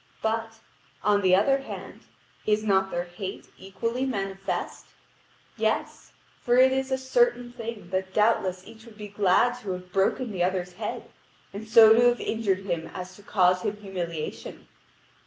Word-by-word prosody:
But, 225 0 -2 0.4
on 205 -1 +3
the 185 -1 +5
other 270 +8 +3
hand, 270 - -9 0.4
is 210 0 +2
not 190 -2 +2
their 175 -2 -2
hate 180 +2 -8
equally 230 +6 -3
manifest? 195 -6 -4 0.7
Yes; - - -2 0.3
for 245 - +2
it 260 +1 +6
is 265 0 -1
a 265 - +2
certain 260 - +1
thing 230 -6 -8
that 190 0 -2
doubtless 190 -3 +1
each 225 +1 -14
would 220 -2 -15
be 210 -1 -8
glad 205 +5 +2
to 200 -6 -4
have 180 0 -9
broken 205 +5 +1
the 180 -3 -1
other's 180 -1 -1
head, - - -6 0.4
and 210 +2 -7
so 220 -1 +8
to 230 - +4
have 240 0 +2
injured 195 -4 -1
him 170 -4 -3
as 185 0 -7
to 205 - -15
cause 185 -3 +2
his 205 +2 -3
humiliation. 175 -6 -6
205 Hz, 160 wpm, -26 LUFS, 185-230 Hz, 0.7 s, so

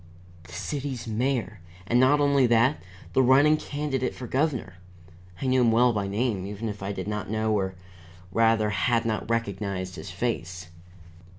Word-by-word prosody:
The 90 - -14
city's 135 -5 -4
mayor! 115 -2 -1 0.3
and 120 +5 +2
not 130 +3 +5
only 140 -3 +4
that, 120 +5 +3 0.3
the 130 - +4
running 135 +4 +5
candidate 145 -4 -3
for 125 - -7
governor. 130 - -1 0.6
I - - -4
knew 130 0 +3
him 115 -2 +4
well 120 +2 +4
by 100 -2 -1
name, 105 -1 -1
even 105 +2 -4
if 105 -1 -7
I 100 +1 -3
did 100 - -5
not 105 -2 -3
know, 110 0 0
or 95 -2 -1 0.6
rather 115 0 +3
had 115 +3 +1
not 110 0 -2
recognized 100 -5 -2
his - - -7
face. 90 +1 -4
115 Hz, 165 wpm, -26 LUFS, 100-130 Hz, 0.6 s, not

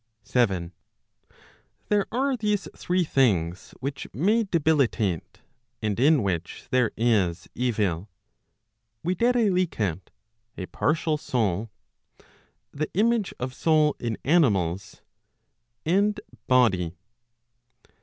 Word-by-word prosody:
7. 95 -9 0 1.2
There 205 -1 +2
are 265 +3 +1
these 210 -6 -1
three 180 0 0
things 95 - 0
which 140 +1 -4
may 210 - +2
debilitate, 140 - 0 0.4
and 105 -1 -2
in 145 -1 +4
which 90 -4 -3
there 125 -3 +3
is 100 -8 +1
evil, 105 -7 -1 1.0
viz. 190 -2 +2 0.9
a 95 - -4
partial 155 0 0
soul; 110 - -1 1.0
the 150 +2 -3
image 220 0 +2
of 125 +1 -3
soul 155 0 +3
in 115 -2 -3
animals; 100 - +1 0.8
and 200 +5 +2 0.3
body. 95 -10 +3
130 Hz, 90 wpm, -26 LUFS, -, 1.2 s, in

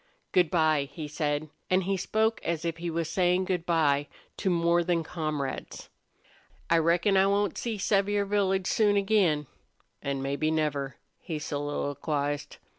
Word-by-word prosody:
"Good 180 -3 +3
by," 155 -4 +2
he 150 +1 -6
said, 150 0 -2 0.2
and 185 +1 +3
he 195 +2 0
spoke 220 +4 0
as 170 -1 -2
if 165 -1 -2
he 170 0 -3
was 165 -1 -1
saying 180 +2 +2
good 180 -2 -2
by 145 -4 +2 0.3
to 195 - 0
more 170 0 +3
than 170 -1 +1
comrades. 155 -4 -4 0.8
"I 165 - +6
reckon 170 +4 +3
I 190 +1 +5
won't 200 -2 +1
see 230 -3 -3
Sevier 200 +1 +1
Village 195 -2 +1
soon 205 +1 +3
again 195 -7 +2 0.6
an' 140 -1 -2
maybe 140 +3 0
never," 145 -4 -1 0.2
he 165 -4 -5
soliloquized. 145 0 -3
170 Hz, 150 wpm, -28 LUFS, 150-190 Hz, 0.8 s, I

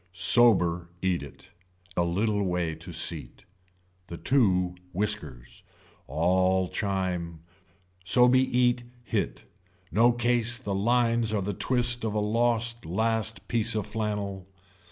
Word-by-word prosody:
Sober 90 -3 +4
eat 90 -2 0
it, 70 - -13 0.4
a - - +1
little 100 +5 0
way 90 -3 -1
to 80 +3 -9
seat. - - -2 0.6
The 85 - -7
two 95 -9 +2 0.2
whiskers. 85 -11 -3 0.5
All 95 +2 +1
chime. 90 -5 -3 0.6
So 125 +7 +4
be 130 +1 +4
eat 125 -1 +1 0.2
hit. - - -3 0.5
No 115 +8 +4
case 120 0 +1
the 110 -5 -5
lines 115 +2 +1
are 100 -3 0
the 100 +2 -3
twist 120 +2 0
of 110 -2 -2
a - - +1
lost 115 +2 0
last 110 +3 -2
piece 115 -1 0
of 105 -3 -1
flannel. 105 -3 -4
105 Hz, 125 wpm, -27 LUFS, 90-115 Hz, 0.6 s, Sober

